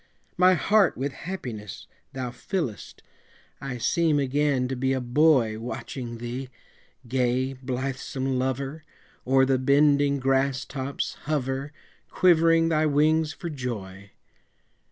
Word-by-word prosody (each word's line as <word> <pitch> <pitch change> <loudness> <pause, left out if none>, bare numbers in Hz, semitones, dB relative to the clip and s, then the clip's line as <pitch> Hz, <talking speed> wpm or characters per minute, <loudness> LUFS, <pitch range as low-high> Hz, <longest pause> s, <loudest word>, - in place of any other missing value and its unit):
My 185 +1 +5
heart 205 +6 +3
with 135 +2 -2
happiness 125 - -7 0.3
thou 130 -2 -4
fillest, 125 - -5 0.6
I 135 -2 -4
seem 155 +5 +2
again 140 -1 +1
to 130 - -2
be 130 +1 0
a 130 - 0
boy 125 -3 +3
Watching 120 0 -6
thee, 120 +3 -5 0.6
gay, 130 +1 0
blithesome 130 0 -3
lover, 135 +4 -3 0.4
O'er 135 0 +5
the 130 -1 +2
bending 140 +1 +3
grass 135 0 +1
tops 135 0 -4
hover, 140 -1 -2 0.4
Quivering 165 -2 +4
thy 155 -1 +2
wings 155 +2 +2
for 170 +1 -6
joy. 100 -8 -6
135 Hz, 115 wpm, -26 LUFS, 125-150 Hz, 0.6 s, My